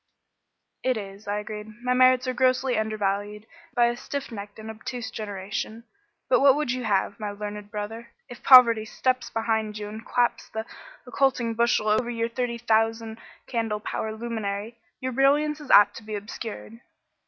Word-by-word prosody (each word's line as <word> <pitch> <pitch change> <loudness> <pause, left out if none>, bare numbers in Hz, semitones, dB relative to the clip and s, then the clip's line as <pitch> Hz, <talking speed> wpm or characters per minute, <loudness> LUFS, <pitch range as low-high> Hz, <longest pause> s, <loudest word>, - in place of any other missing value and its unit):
"It 255 -2 +1
is," 200 0 -8
I 205 0 -1
agreed. 210 0 -6 0.2
"My 250 0 +2
merits 255 0 +5
are 255 - 0
grossly 255 0 +2
undervalued 210 -1 -2 0.3
by 240 -1 +5
a 240 0 +1
stiff 280 +2 -5
necked 205 -2 -8
and 220 0 -7
obtuse 230 +2 -6
generation. 210 +2 -5 0.4
But - - +4
what 275 -1 +7
would 295 -4 -1
you 255 -1 -3
have, 205 +1 0
my 210 -1 -3
learned 205 0 -6
brother? 225 +2 -6 0.2
If 245 -2 -11
poverty 235 -4 +8
steps 255 +3 -1
behind 220 -2 -1
you 210 -1 -5
and 220 +2 -8
claps 245 +1 0
the 220 0 -4 0.4
occulting 250 -2 +1
bushel 235 -1 +2
over 215 +3 +2
your 230 -1 -1
thirty 240 0 -2
thousand 225 -1 0 0.3
candle 225 -3 -2
power 220 +1 -3
luminary, 220 -1 -4 0.2
your 260 0 -3
brilliancy 295 +3 +2
is - - -14
apt 205 - +7
to - - -10
be 215 0 -5
obscured." 215 +2 -7
225 Hz, 165 wpm, -26 LUFS, 210-250 Hz, 0.4 s, poverty